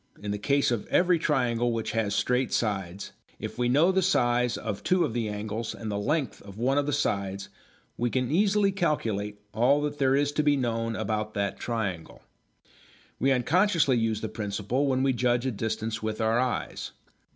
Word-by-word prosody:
In 105 Hz, 0 st, -4 dB
the 105 Hz, -, -3 dB
case 140 Hz, +4 st, +2 dB
of 115 Hz, -4 st, -2 dB
every 180 Hz, -1 st, +3 dB
triangle 120 Hz, -6 st, +1 dB
which 115 Hz, -1 st, -2 dB
has 105 Hz, -3 st, 0 dB
straight 125 Hz, +1 st, +1 dB
sides, 100 Hz, -4 st, -2 dB, 0.3 s
if -, -, -7 dB
we 120 Hz, 0 st, +2 dB
know 155 Hz, +8 st, +4 dB
the 190 Hz, 0 st, +2 dB
size 125 Hz, -9 st, +2 dB
of 105 Hz, -3 st, -4 dB
two 180 Hz, -1 st, +2 dB
of 125 Hz, -, -4 dB
the 115 Hz, -2 st, -1 dB
angles 105 Hz, +2 st, -4 dB
and 110 Hz, -2 st, -5 dB
the 100 Hz, -, -2 dB
length 140 Hz, +2 st, -1 dB
of 100 Hz, 0 st, -12 dB
one 135 Hz, +5 st, +2 dB
of 145 Hz, -, -1 dB
the -, -, +1 dB
sides 100 Hz, -8 st, -1 dB, 0.5 s
we 120 Hz, +1 st, 0 dB
can 125 Hz, +1 st, -1 dB
easily 200 Hz, +3 st, +3 dB
calculate 110 Hz, -, -1 dB
all 125 Hz, +7 st, +3 dB
that 145 Hz, -1 st, -3 dB
there 135 Hz, -1 st, +3 dB
is 145 Hz, +1 st, +2 dB
to 150 Hz, -, +1 dB
be 145 Hz, -1 st, +3 dB
known 115 Hz, -3 st, -1 dB
about 110 Hz, 0 st, -2 dB
that 100 Hz, -1 st, -2 dB
triangle. 100 Hz, -8 st, -4 dB, 1.0 s
We 135 Hz, -, +3 dB
unconsciously 160 Hz, +2 st, +3 dB
use 115 Hz, -2 st, 0 dB
the 110 Hz, -, -2 dB
principle 105 Hz, +6 st, -2 dB
when 130 Hz, -1 st, +1 dB
we 135 Hz, -1 st, +3 dB
judge 120 Hz, 0 st, +1 dB
a 130 Hz, -, +1 dB
distance 110 Hz, 0 st, -3 dB
with 110 Hz, 0 st, -3 dB
our 110 Hz, +1 st, +2 dB
eyes. 125 Hz, -1 st, -2 dB
120 Hz, 190 wpm, -27 LUFS, 110-140 Hz, 1.0 s, know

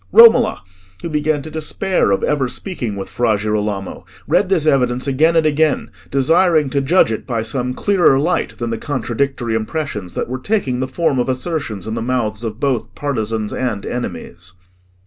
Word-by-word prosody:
Romola, 350 Hz, -, +6 dB, 0.4 s
who 170 Hz, -, -3 dB
began 150 Hz, -1 st, 0 dB
to 155 Hz, -, -8 dB
despair 170 Hz, -, 0 dB
of 100 Hz, -, +1 dB
ever 145 Hz, -3 st, +1 dB
speaking 125 Hz, -, -4 dB
with 95 Hz, -1 st, -5 dB
Fra 110 Hz, +2 st, +1 dB
Girolamo, 105 Hz, -2 st, -2 dB, 0.2 s
read 195 Hz, -, +2 dB
this 175 Hz, -6 st, +2 dB
evidence 125 Hz, -4 st, +2 dB
again 155 Hz, +5 st, +2 dB
and 160 Hz, -1 st, +3 dB
again, 155 Hz, -3 st, +1 dB, 0.2 s
desiring 155 Hz, +1 st, +3 dB
to 140 Hz, -, +1 dB
judge 135 Hz, -3 st, +3 dB
it 110 Hz, -, -4 dB
by 115 Hz, -4 st, -1 dB
some 125 Hz, +2 st, -2 dB
clearer 185 Hz, -8 st, +3 dB
light 170 Hz, +5 st, -1 dB
than 120 Hz, -1 st, -3 dB
the 115 Hz, -, -3 dB
contradictory 130 Hz, -2 st, -2 dB
impressions 110 Hz, -, -3 dB
that -, -, -2 dB
were 130 Hz, +2 st, -4 dB
taking 135 Hz, -, -1 dB
the 130 Hz, -, -1 dB
form 135 Hz, -1 st, 0 dB
of 125 Hz, -, 0 dB
assertions 130 Hz, -, -3 dB
in 110 Hz, -, -4 dB
the 115 Hz, -, -3 dB
mouths 115 Hz, -3 st, -1 dB
of 110 Hz, 0 st, -5 dB
both 135 Hz, -5 st, -1 dB
partisans 110 Hz, -6 st, -2 dB
and 115 Hz, -6 st, -2 dB
enemies. 90 Hz, -7 st, -6 dB
130 Hz, 175 wpm, -18 LUFS, 110-155 Hz, 0.4 s, Romola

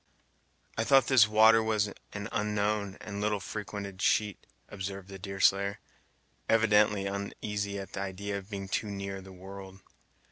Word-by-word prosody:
"I -, -, +3 dB
thought 135 Hz, +1 st, +5 dB
this 120 Hz, -4 st, +6 dB
water 110 Hz, +1 st, +6 dB, 0.5 s
an 100 Hz, -1 st, -4 dB
unknown 105 Hz, -1 st, -1 dB
and 100 Hz, -1 st, -5 dB
little 105 Hz, -1 st, +1 dB
frequented 100 Hz, -1 st, -6 dB
sheet," 105 Hz, -1 st, +1 dB, 0.2 s
observed 100 Hz, -1 st, -6 dB
the 95 Hz, -1 st, -8 dB
Deerslayer, 100 Hz, +1 st, +1 dB, 0.7 s
evidently 105 Hz, -2 st, +4 dB
uneasy 100 Hz, +1 st, -3 dB
at 100 Hz, -1 st, -7 dB
the 95 Hz, -, -3 dB
idea 100 Hz, +1 st, -3 dB
of 100 Hz, +1 st, -14 dB
being 100 Hz, -2 st, -5 dB
too 100 Hz, +2 st, -1 dB
near 100 Hz, -1 st, -5 dB
the 95 Hz, 0 st, -12 dB
world. 95 Hz, +1 st, -10 dB
100 Hz, 140 wpm, -30 LUFS, 95-105 Hz, 0.7 s, this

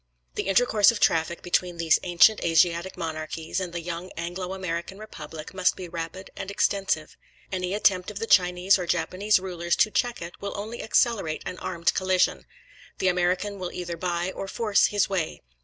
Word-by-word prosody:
The -, -, -3 dB
intercourse 205 Hz, 0 st, +4 dB
of 230 Hz, -, 0 dB
traffic 165 Hz, +1 st, +1 dB
between 175 Hz, 0 st, 0 dB
these 165 Hz, -1 st, +3 dB
ancient 180 Hz, +5 st, +4 dB
Asiatic 170 Hz, +2 st, +2 dB
monarchies, 160 Hz, 0 st, -4 dB
and 185 Hz, -2 st, -4 dB
the 170 Hz, 0 st, -4 dB
young 175 Hz, +2 st, -5 dB
Anglo 180 Hz, +2 st, -4 dB
American 180 Hz, 0 st, -4 dB
Republic, 200 Hz, -6 st, -9 dB
must 185 Hz, -1 st, +2 dB
be 185 Hz, -, -7 dB
rapid 170 Hz, +2 st, -6 dB
and 190 Hz, -, -6 dB
extensive. 195 Hz, -4 st, 0 dB, 0.4 s
Any 185 Hz, 0 st, -2 dB
attempt 185 Hz, -3 st, +2 dB
of 210 Hz, -, -7 dB
the 225 Hz, -, -2 dB
Chinese 180 Hz, -1 st, +4 dB
or 180 Hz, -, -4 dB
Japanese 185 Hz, +5 st, +2 dB
rulers 175 Hz, -2 st, -2 dB
to 215 Hz, -, +3 dB
check 245 Hz, +1 st, 0 dB
it, 170 Hz, +1 st, -9 dB
will 200 Hz, 0 st, -4 dB
only 220 Hz, +4 st, -5 dB
accelerate 220 Hz, -8 st, +1 dB
an 180 Hz, -, -5 dB
armed 170 Hz, -2 st, 0 dB
collision. 185 Hz, -1 st, +1 dB, 0.5 s
The 190 Hz, -, +2 dB
American 180 Hz, +3 st, 0 dB
will 180 Hz, -1 st, -4 dB
either 175 Hz, -1 st, -5 dB
buy 175 Hz, +1 st, -2 dB
or 195 Hz, -, -6 dB
force 210 Hz, 0 st, +2 dB
his 205 Hz, -1 st, +1 dB
way. 180 Hz, -5 st, -3 dB
180 Hz, 175 wpm, -26 LUFS, 170-195 Hz, 0.5 s, intercourse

